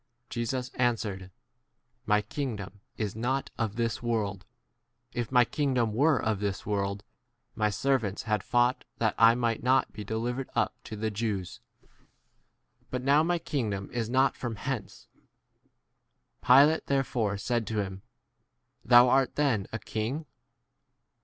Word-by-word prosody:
Jesus 125 +2 -2
answered, 105 -6 -1 0.8
My 105 -1 +3
king 130 +2 -3
dom 100 0 -9 0.2
is 105 -3 -3
not 130 +4 -1
of 110 -2 -1
this 115 +2 -1
world; 105 -5 -2 0.7
if 120 0 -3
my 125 -2 +5
kingdom 130 -6 0
were 145 +5 +3
of 110 -2 -1
this 100 -2 -3
world, 100 -1 -2 0.5
my 105 -1 +1
servants 110 -1 0
had 105 -3 0
fought 120 +3 +1
that 110 -2 +1
I 115 0 +7
might 115 -2 0
not 130 +2 +2
be 105 - -6
delivered 120 +5 -3
up - - +1
to 110 - -6
the 110 +1 -2
Jews; 105 -4 -3 1.3
but 125 0 -3
now 140 +3 +5
my 175 +2 +1
kingdom 110 -12 -3
is 115 -2 -2
not 130 +2 +3
from 120 -3 -4
37 130 +6 -4
hence. 120 -7 -6 1.4
Pilate 145 +5 +6
therefore 120 -7 0
said 120 +1 -1
to 105 -1 0
him, 95 0 -7 0.8
Thou' 120 +1 +7
art 130 +1 +2
then 130 -10 +1
a 115 - -2
king? 115 +9 -3
115 Hz, 140 wpm, -28 LUFS, 105-130 Hz, 1.4 s, I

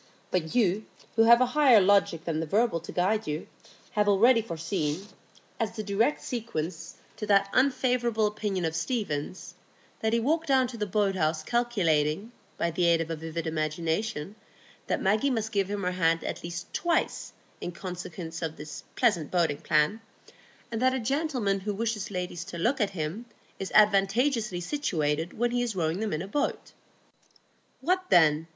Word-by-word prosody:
But 160 -3 -1
you, 215 -3 +2 0.3
who 225 0 +5
have 235 +1 +7
a - - +6
higher 275 -7 +6
logic 190 -4 +3
than 160 -2 -1
the 160 - -3
verbal 210 0 +2
to 165 - -9
guide 210 +5 0
you, 150 +2 -3 0.5
have 210 -1 +1
already 230 +4 +5
foreseen, 165 -2 -3 0.5
as 225 -2 -2
the 215 - -4
direct 215 +8 +1
sequence 165 -9 -4 0.2
to 210 -1 -5
that 200 -1 +3
unfavourable 250 -4 +2
opinion 210 -4 -1
of 160 0 -2
Stephen's, 160 - -3 0.5
that 220 - 0
he 235 - +2
walked 320 +7 0
down 265 -2 +4
to 240 - -8
the 210 -1 -2
boathouse 185 -6 0
calculating, 195 -5 +1 0.3
by 170 - 0
the 175 +1 +1
aid 170 -1 +4
of 165 0 -3
a - - -1
vivid 160 +1 -5
imagination, 160 +3 -2 0.5
that - - -1
Maggie 210 +8 +2
must 220 -4 -1
give 200 -3 0
him 205 -1 -3
her 180 - 0
hand 165 -2 +1
at - - -5
least 170 +1 -6
twice 345 -1 0 0.3
in 175 - -4
consequence 175 -2 -7
of 160 -1 -3
this 150 0 -8
pleasant 205 - +2
boating 165 -5 +1
plan, 160 +7 +1 0.7
and 225 0 -3
that 260 0 +3
a - - -1
gentleman 250 -6 0
who 205 +1 -3
wishes 220 -1 -2
ladies 180 -3 -4
to 180 -3 -7
look 240 +9 +1
at 205 - +2
him 180 +5 -4 0.3
is 195 - -4
advantageously 210 0 +3
situated 165 - -1
when 240 +1 +1
he 245 0 0
is 235 -4 -2
rowing 165 0 0
them 220 -1 -2
in 155 +3 -2
a - - -7
boat. 285 +8 -2 1.1
What 370 +6 +1
then? 160 -1 +4
195 Hz, 170 wpm, -28 LUFS, 165-230 Hz, 1.1 s, have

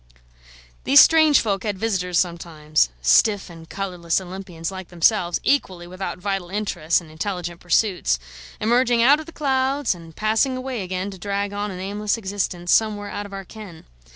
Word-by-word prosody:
These 140 - +7
strange 315 -3 +6
folk 200 -3 -1
had 205 -2 -3
visitors 185 -4 -1
sometimes, 165 - 0
stiff 200 - +3
and 165 -1 -13
colourless 180 -4 -2
Olympians 180 -2 -7
like 190 -2 -8
themselves, 175 0 +1
equally 185 -11 0
without 185 +2 -6
vital 195 -1 -3
interests 190 -5 0
and 160 -2 -14
intelligent 175 0 -4
pursuits: 180 - +1 0.4
emerging 235 +1 +3
out 285 +5 +6
of 315 - -9
the - - -9
clouds, 270 -3 0
and 165 -2 -13
passing 225 +5 +1
away 255 -3 -4
again 185 +1 -4
to 190 - -11
drag 200 +1 -2
on 205 +1 -3
an 185 -2 -7
aimless 205 +3 -2
existence 190 -4 -3
somewhere 210 -2 +1
out 205 - -5
of - - -17
our 195 -1 -6
ken. 200 -5 -11
195 Hz, 165 wpm, -22 LUFS, 175-215 Hz, 0.4 s, These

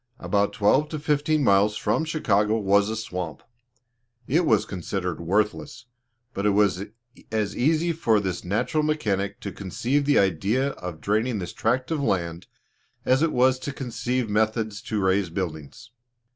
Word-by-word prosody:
About 100 0 0
twelve 125 +7 +2
to 155 - -4
fifteen 150 0 +1
miles 100 -1 +3
from 160 - 0
Chicago 110 -9 +1
was 100 0 +3
a 110 - -2
swamp: 90 -9 -5 0.8
it 160 +8 +1
was 110 -1 +3
considered 90 -3 -4
worthless, 105 +6 -1 0.5
but 100 - -3
it 105 - +3
was 100 -2 +2 0.5
as 105 -2 -1
easy 160 +6 +2
for 115 -10 +2
this 95 -3 -3
natural 105 - 0
mechanic 105 -10 -1
to 100 - -5
conceive 120 +10 -1
the 145 0 +3
idea 100 - +2
of 90 - -7
draining 110 +3 0
this 90 -3 -5
tract 125 +6 0
of 155 -3 0
land, 85 -8 -1 0.6
as 130 +2 +3
it 165 -1 +2
was 130 +1 +3
to 140 - -4
conceive 125 -1 -2
methods 110 0 0
to 110 - -3
raise 95 -1 +1
buildings. 85 - -6
105 Hz, 155 wpm, -25 LUFS, 95-130 Hz, 0.8 s, miles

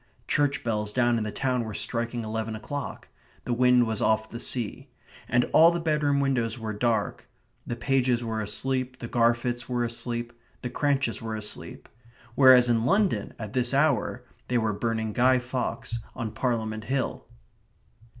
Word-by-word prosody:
Church 145 -1 +1
bells 105 -2 -1
down 120 0 +2
in - - -2
the 105 - -3
town 125 -1 0
were 110 -2 -6
striking 115 +2 -1
eleven 110 0 -3
o'clock. 130 +5 -6 0.4
The 120 - 0
wind 125 0 +4
was 110 -2 -1
off 110 0 +1
the 115 - -7
sea. 120 -3 -3 0.4
And 120 +1 +3
all 165 +2 +8
the 170 0 -1
bedroom 150 -3 +1
windows 125 -5 0
were 110 -2 -4
dark 115 +2 -1 0.4
the 120 - -2
Pages 125 -1 +1
were 110 -1 -2
asleep; 130 +4 -2
the 120 - -6
Garfits 120 +1 +1
were 120 -1 0
asleep; 120 0 -3 0.3
the 125 - -3
Cranches 140 -3 0
were 110 -1 -4
asleep 105 -1 -6 0.5
whereas 130 -1 +7
in 115 -2 +2
London 135 - +1
at 110 -2 -7
this 125 +1 +2
hour 140 -4 +1 0.2
they 125 - +1
were 110 -2 +1
burning 110 0 -2
Guy 130 +1 +4
Fawkes 125 -1 -3 0.2
on 115 -3 -4
Parliament 110 -2 -2
Hill. 130 -1 -2
120 Hz, 160 wpm, -27 LUFS, 110-130 Hz, 0.5 s, all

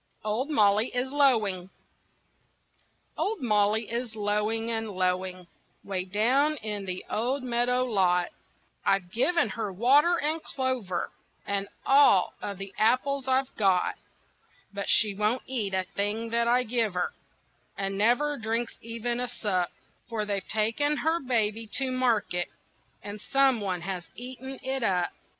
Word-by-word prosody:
OLD 225 +7 -1
MOLLY 210 -4 +4
IS 255 +1 -1
LOWING 215 -11 +2 1.5
Old 435 0 -1
Molly 215 -2 +2
is 235 -1 -4
lowing 215 +2 0
and 225 -1 -2
lowing 185 -1 -1 0.4
'Way 185 -2 -3
down 250 +10 +2
in 210 -4 -4
the 185 -1 -4
old 250 +5 -1
meadow 250 +1 +1
lot. 180 -6 +2 0.5
I've 190 -3 +1
given 335 - +2
her 205 0 -3
water 280 - +4
and 315 +2 -1
clover, 255 -12 -2 0.3
And 200 0 -1 0.2
all 270 -9 +5
of 200 -1 -4
the 195 0 -7
apples 255 +5 +2
I've 265 0 +1
got; 190 -4 +3 0.8
But 200 0 -3
she 210 -3 +5
won't 210 +5 0
eat 215 -7 -2
a 185 - +1
thing 210 +4 -3
that 235 0 +2
I 245 +1 +4
give 225 -4 0
her, 180 - -1 0.6
And 195 -1 -2
never 245 +8 +2
drinks 225 +1 -2
even 230 +1 -3
a 250 - -1
sup, 190 -7 -1 0.4
For 220 -2 -2
they've 200 -2 -3
taken 230 +8 +1
her 320 +3 +1
baby 225 -4 0
to 265 -2 0
market 230 -8 +1 0.6
And 205 +1 -7
some 270 -3 +3
one 185 -3 -2
has 180 -1 -5
eaten 260 +2 -8
it 265 0 -2
up. 180 -5 +1
225 Hz, 140 wpm, -28 LUFS, 200-255 Hz, 1.5 s, all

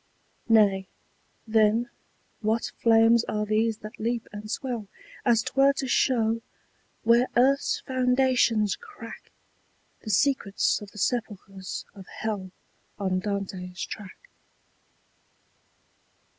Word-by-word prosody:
Nay, 200 -4 +4 0.6
then, 225 +2 +2 0.5
what 220 +1 0
flames 230 0 +5
are 210 0 -2
these 215 +1 +1
that 215 - -9
leap 235 +1 -2
and 210 0 -8
swell 240 -3 -3 0.4
As 230 -2 +3
'twere 275 0 +3
to 275 -1 -3
show, 230 -3 +2 0.6
where 235 +2 +4
earth's 275 +3 +3
foundations 250 -5 +2
crack, 420 -3 -12 0.7
The 220 - -8
secrets 210 -2 +1
of 205 - -9
the 210 - -16
sepulchres 195 -4 -3
of 195 -2 -12
hell 205 -4 -4 0.5
On 190 -2 0
Dante's 190 -2 -4
track? 205 -4 -9
220 Hz, 105 wpm, -26 LUFS, 205-240 Hz, 0.7 s, flames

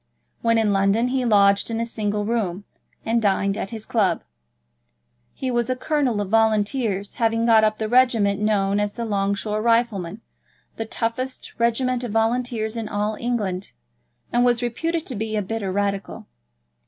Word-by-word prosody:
When 230 0 +3
in 215 -2 +2
London 200 +5 +2
he 255 -1 0
lodged 200 -2 +4
in 225 0 -2
a 230 - 0
single 210 -2 -2
room, 205 -5 -1 0.4
and 230 +1 +1
dined 200 -1 +1
at 195 - -4
his 220 -2 -7
club. 210 -5 +1 1.1
He 260 -1 -3
was 240 0 0
a 255 - +1
Colonel 260 -4 0
of 200 - -4
Volunteers, 215 -1 +1
having 225 0 +2
got 225 -2 +5
up 215 0 +2
the 220 - -2
regiment 225 -5 +3
known 205 -1 +1
as 205 0 -1
the 235 - -4
Long 200 -2 0
Shore 210 +1 -2
Riflemen, 225 -4 +1 0.6
the 225 - -4
roughest 255 +3 -3
regiment 245 +2 +1
of 235 -4 -4
Volunteers 225 0 0
in 225 -2 -4
all 210 +1 -1
England, 205 -6 -2 0.6
and 240 +1 +3
was 245 -1 +2
reputed 325 +7 -2
to 260 - -4
be 220 +1 -3
a 210 - +1
bitter 200 -1 -3
Radical. 200 0 -2
220 Hz, 165 wpm, -23 LUFS, 205-235 Hz, 1.1 s, got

